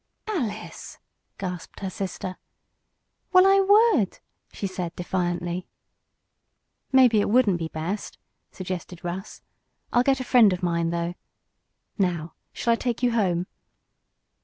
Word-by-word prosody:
"Alice!" 240 - -4 0.4
gasped 180 -1 -6
her 195 - -2
sister. 185 -1 -5 0.9
"Well, 370 0 +7
I 390 0 +6
would," 405 - +4 0.3
she - - -5
said, 180 -3 -4
defiantly. 175 -1 -2 1.2
"Maybe 250 -5 +6
it - - 0
wouldn't 210 -6 +3
be 165 - -2
best," 165 +6 -4 0.3
suggested 185 -1 -6
Russ. 180 +3 -6 0.5
"I'll 245 - +5
get 265 +1 +2
a - - -2
friend 235 -6 +5
of 180 0 -5
mine, 170 -1 +1
though. 170 0 -2 0.9
Now 170 -4 0 0.2
shall 235 - +1
I - - 0
take 240 -1 -2
you 245 - +4
home?" 185 -6 +1
190 Hz, 125 wpm, -25 LUFS, 175-245 Hz, 1.2 s, Well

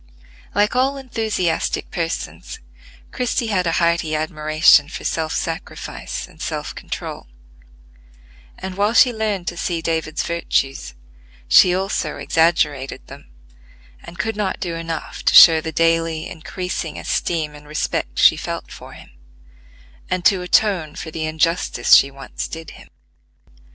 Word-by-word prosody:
Like 205 +3 +2
all 265 +2 +1
enthusiastic 220 -10 -2
persons, 170 -2 -4 0.5
Christie 245 -2 -1
had 180 -3 +1
a 165 - +1
hearty 170 -2 +1
admiration 155 -1 +3
for - - -7
self 160 -1 -2
sacrifice 165 0 -5
and - - -17
self - - -4
control; - - -7 1.3
and, 190 0 -6
while 205 +3 +1
she 250 -1 +6
learned 215 -5 -2
to 175 - -4
see 170 -1 -2
David's 160 -1 -2
virtues, 135 - -2 0.5
she 180 - +6
also 195 +2 -2
exaggerated 150 -5 0
them, - - -13 0.7
and 175 - -11
could 220 +5 -2
not 205 -2 -2
do 175 -2 -3
enough 165 -1 -5
to - - +3
show 160 -2 +9
the 160 - -5
daily 165 0 +1
increasing 180 +2 -5
esteem 155 -3 -2
and 150 0 -14
respect 60 - -3
she - - +6
felt - - -6
for - - -11
him, - - -14 1.0
and 185 -1 -2
to 190 -3 +4
atone 180 -4 +1
for 160 - -7
the 160 0 -3
injustice 165 +2 +1
she 140 - +7
once 135 0 -7
did 160 -1 -8
him. - - -14
165 Hz, 135 wpm, -20 LUFS, 155-190 Hz, 1.3 s, show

